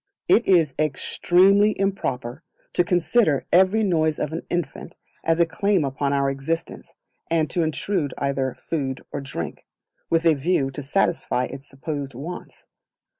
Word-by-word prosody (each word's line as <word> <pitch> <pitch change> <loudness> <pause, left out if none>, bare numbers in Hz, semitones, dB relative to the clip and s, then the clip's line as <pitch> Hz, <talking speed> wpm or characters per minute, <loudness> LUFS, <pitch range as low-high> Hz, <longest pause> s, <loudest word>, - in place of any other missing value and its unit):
It 235 - +4
is 165 -7 +4
Extremely 185 +7 +3
Improper 140 -9 -2 0.3
to 175 - +3
consider 175 - +2
every 190 +5 +4
noise 160 -5 +1
of 150 - -3
an 165 - -3
infant 175 -6 -4 0.3
as 165 +1 +1
a 170 - +6
claim 195 0 +1
upon 140 +1 -1
our 140 -1 +1
assistance, 135 +5 -4 0.3
and 165 -2 +2
to 175 - +1
intrude 160 -1 -1
either 135 -2 -1
food 135 0 -4
or 145 - -4
drink, 85 - -6 0.4
with 165 0 +1
a 165 - +6
view 140 -2 0
to 145 - -5
satisfy 150 -3 0
its 135 +2 -7
supposed 140 -1 -5
wants. 165 +8 -8
155 Hz, 145 wpm, -23 LUFS, 135-175 Hz, 0.4 s, a